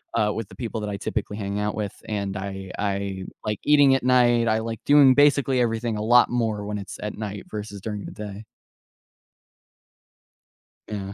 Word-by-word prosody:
uh, 105 -1 +2
with 115 -3 -5
the - - -13
people 115 -3 -4
that 105 - -3
I 100 - -3
typically 105 +1 -3
hang 100 0 -3
out 105 0 -1
with, 105 -2 -3 0.2
and 100 -2 -2
I 95 -1 -6
I 100 -1 -2 0.2
like 105 -1 -2
eating 145 -2 +5
at 135 - -1
night, 120 -2 +4
I 110 0 +2
like 115 0 -4
doing 140 -2 +7
basically 140 -3 +4
everything 115 -1 0
a - - -3
lot 120 +2 +5
more 110 -4 -1
when 105 0 -3
it's 100 - -8
at 105 0 -5
night 105 -2 -5
versus 105 -1 -6
during 105 -2 -5
the - - -7
day. 105 0 -8 2.4
Yeah. 100 -2 -5
105 Hz, 185 wpm, -24 LUFS, 100-120 Hz, 2.4 s, doing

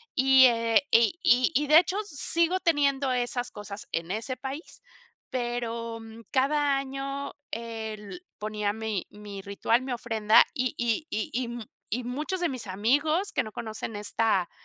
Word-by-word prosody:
Y, 265 -1 +7
eh, 230 0 +4
y 230 +6 +4
y 255 -4 +4
y 295 +1 +1
de 305 +2 +9
hecho, 365 +3 -1
sigo 335 +2 +1
teniendo 280 -5 +2
esas 245 0 -1
cosas 205 0 -8
en 165 +1 -3
ese 225 +5 -3
país, 280 - -7 0.5
pero, 235 -2 -3
mm, 225 0 -11
cada 280 +1 +2
año, 275 +1 -4 0.2
el 225 - -6
ponía 210 -1 -2
mi 220 -3 -3
mi 205 -1 -9
ritual, 200 +5 +1
mi 260 - -5
ofrenda 225 -3 +4
y 255 -1 -1
y 240 +5 0
y 215 - -2
y 250 +1 0
m 235 -1 -6 0.2
y 245 +4 -2
muchos 300 +9 -3
de 350 - +1
mis 255 -5 -4
amigos 290 - +1
que 255 - +1
no 215 - -8
conocen 220 0 -5
esta 205 -3 +1
240 Hz, 160 wpm, -27 LUFS, 220-275 Hz, 0.5 s, de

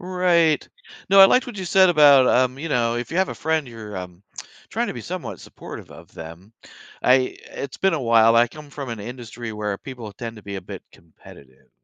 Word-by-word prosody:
Right. 180 -3 +1 0.4
No, 195 0 +6
I 195 - +11
liked 255 +6 +2
what 240 -4 -8
you 190 - -5
said 190 +1 +4
about, 145 -5 +6
um, 130 +1 +2
you 165 +3 -5
know, 120 -3 0
if 120 - -5
you 165 - -4
have 190 - +2
a - - -5
friend, 160 -4 -1
you're, 110 -4 -9
um, 90 0 -9 0.5
trying - - -2
to - - -3
be - - -8
somewhat - - -7
supportive - - -11
of - - -15
them. 85 +6 -11 0.5
I 130 0 +3
eh, - - -7
it's 140 - -6
been 195 -2 +1
a 145 - -3
while. 115 -1 +4
I 120 0 +4
come 150 0 -13
from 140 -3 -7
an 115 -2 -6
industry 120 0 -8
where 105 -2 -4
people 120 -6 -9
tend 115 +2 -8
to 105 - -13
be 100 -1 -7
a - - -5
bit - - -10
competitive 70 -5 -19
125 Hz, 225 wpm, -22 LUFS, 110-160 Hz, 0.5 s, I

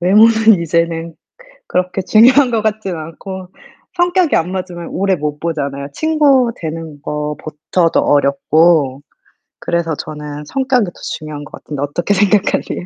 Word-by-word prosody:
외모는 220 +2 +5
이제는 165 0 -1 0.5
그렇게 185 +1 -1
중요한 250 +7 +5
거 230 -2 +1
같진 210 -4 -2
않고. 180 +4 -8 0.5
성격이 350 -2 +2
안 170 +2 0
맞으면 180 -3 -5
오래 195 0 0
못 150 -1 -4
보잖아요. 140 -4 -3
친구 285 - +3
되는 160 -2 -7
것부터도 150 +3 -1
어렵고. 145 0 +2 0.6
그래서 170 -2 -1
저는 150 0 -7
성격이 260 - +1
더 175 - -11 0.2
중요한 150 -1 -8
것 - - -16
같은데 145 -2 -6
어떻게 165 +7 -1
생각하세요? 205 -2 +1
170 Hz, 310 characters per minute, -16 LUFS, 150-215 Hz, 0.6 s, 외모는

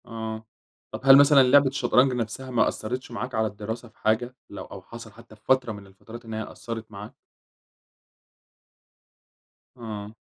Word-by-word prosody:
آه، 110 -1 -6 0.5
طَب - - -7
هل 135 0 +9
مثلًا 140 -1 +7
لعبة 135 +2 +5
الشطرنج 130 0 +2
نَفسها 125 +2 -4
ما 120 -2 +3
أثرِتش 125 +3 -5
معاك 125 +1 -5
على 110 0 +1
الدراسة 110 +3 -7
في 110 - -32
حاجة، 120 +4 0
لو 100 - -8
أو 100 - -10
حصَل 115 +4 -11
حتّى 115 +1 -16
في 105 - -29
فترة 130 -3 +2
من 100 -2 -10
الفترات 110 +5 -13
إن 110 - -8
هي 110 0 -3
قصّرت 115 -1 -8
معاك؟ 105 +4 -9 2.6
آه. 110 -2 -7
115 Hz, 155 wpm, -25 LUFS, 110-125 Hz, 2.6 s, هل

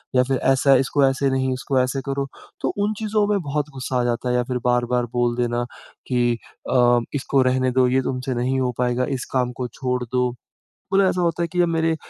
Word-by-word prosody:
या 125 - +5
फिर 130 0 0 0.2
ऐसा 135 +1 +4
इसको 140 0 +2
ऐसे 135 +1 0
नहीं, 130 0 0
इसको 130 +1 -1
ऐसे 135 +1 -1
करो, 140 0 -1 0.3
तो - - -1
उन 205 +1 +1
चीज़ों 215 -1 +1
में 205 -1 +1
बहुत 150 -1 -2
ग़ुस्सा 130 -1 -2
आ - - 0
जाता 120 +1 -1
है 125 - +1
या 125 - +2
फिर 125 - +1
बार-बार 120 0 +1
बोल 120 -1 +1
देना 120 0 0 0.4
कि 120 -2 +1 0.3
अ, 120 -1 +5 0.2
इसको 135 0 +1
रहने 130 0 +1
दो 130 0 +3
ये 130 +1 +2
तुमसे 130 0 -3
नहीं 130 +2 0
हो 125 -1 0
पाएगा, 125 0 +1
इस 130 -2 -3
काम 125 -1 +1
को 125 - -1
छोड़ 125 0 -3
दो। 125 +1 0 0.6
मतलब 195 -1 +5
ऐसा 180 - -1
होता 170 0 0
है - - 0
कि 175 +2 0
अब 175 - +3
मेरे 165 0 +2
अ, - - -1
130 Hz, 230 wpm, -22 LUFS, 125-140 Hz, 0.6 s, या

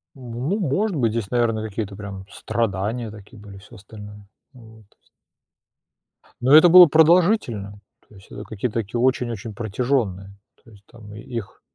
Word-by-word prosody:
Ну, 130 - -4
может 190 +4 -1
быть, 115 -6 0
здесь, 115 -2 -4
наверное, 115 -3 0
какие-то 100 -1 -6
прям 100 -2 -9
страдания 115 +1 -3
такие 105 +2 -14
были, 100 -1 -13
всё 100 +5 -16
остальное. 105 0 -13 0.3
Вот. 110 -3 -17 1.6
Но 130 +4 +3
это 165 +3 +8
было 180 +1 +10
продолжительно, 160 - +2 0.3
то 105 - -20
есть 95 - -18
это 105 - -8
какие-то 115 +2 -4
такие 115 +2 -4
очень-очень 120 -4 -1
протяженные. 105 -3 -3 0.3
То 115 - -19
есть 100 -1 -19
там 105 -3 -14
и 105 - -10
их 115 -3 -8
115 Hz, 150 wpm, -21 LUFS, 105-125 Hz, 1.6 s, было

